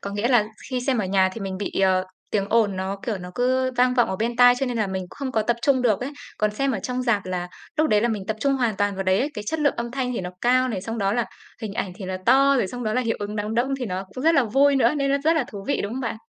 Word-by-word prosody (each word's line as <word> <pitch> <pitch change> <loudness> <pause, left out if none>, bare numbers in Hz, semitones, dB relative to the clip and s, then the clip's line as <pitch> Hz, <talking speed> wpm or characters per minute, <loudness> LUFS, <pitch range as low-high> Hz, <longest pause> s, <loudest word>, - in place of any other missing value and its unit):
có 200 - -5
nghĩa 205 +4 -1
là 240 -5 +4 0.3
khi 255 -1 -1
xem 255 -1 0
ở 210 - 0
nhà 190 0 +3
thì 225 - -8
mình 190 -1 -4
bị, 200 - -3
ờ, 185 -1 +3 0.3
tiếng 200 -2 0
ồn 215 -4 +2
nó, 190 +1 -3
kiểu, 220 -5 -2
nó 180 0 -8
cứ 255 +1 +1
vang 250 0 +3
vọng 245 -2 +3
ở 190 - -2
bên 235 +4 -2
tai 245 0 +7
cho 270 - 0
nên 245 -2 -2
là 215 -2 +1
mình 190 -1 -3
không 275 -2 -5
có 220 - +2
tập 235 +2 0
trung 260 -1 +3
được 220 -5 +2
ấy. 260 +3 -3 0.3
Còn 215 0 +2
xem 275 +6 -1
ở 220 - -1
trong 250 +3 -3
rạp 220 -6 +1
là 180 -1 -3 0.3
lúc 310 0 +2
đấy 210 - +4
là 235 - +1
mình 210 -4 -3
tập 220 +1 -2
trung 275 +2 +2
hoàn 240 -6 0
toàn 205 0 0
vào 195 - -2
đấy 185 +1 +3
ấy, 285 +6 0
cái 210 - -5
chất 320 +5 -2
lượng 290 -1 +2
âm 235 0 -3
thanh 250 -1 -2
thì 235 - -2
nó 180 -1 -5
cao 255 +1 +3
này, 220 -6 -3
xong 225 +2 -4
đó 195 -1 +1
là 240 +1 +1 0.4
hình 215 -2 -4
ảnh 185 - -3
thì 195 - -7
nó 185 0 -4
to, 275 +3 +5
rồi 240 - +1
xong 245 +5 -6
đó 215 - 0
là 255 - +1
hiệu 230 -2 -1
ứng 205 +1 -4
đám 210 +1 -2
đông 240 +3 +1
thì 250 - -3
nó 185 0 -3
cũng 255 - -5
rất 330 +1 +5
là 275 -5 +4
vui 275 +5 +3
nữa, 250 +1 +3
nên 275 -1 0
nó 280 - +3
rất 325 +1 +4
là 280 - +2
thú 200 -3 -8
vị, 285 - +1
đúng 205 +3 -4
không 260 - -4
bạn? 230 -3 -3
230 Hz, 330 wpm, -24 LUFS, 200-255 Hz, 0.4 s, tai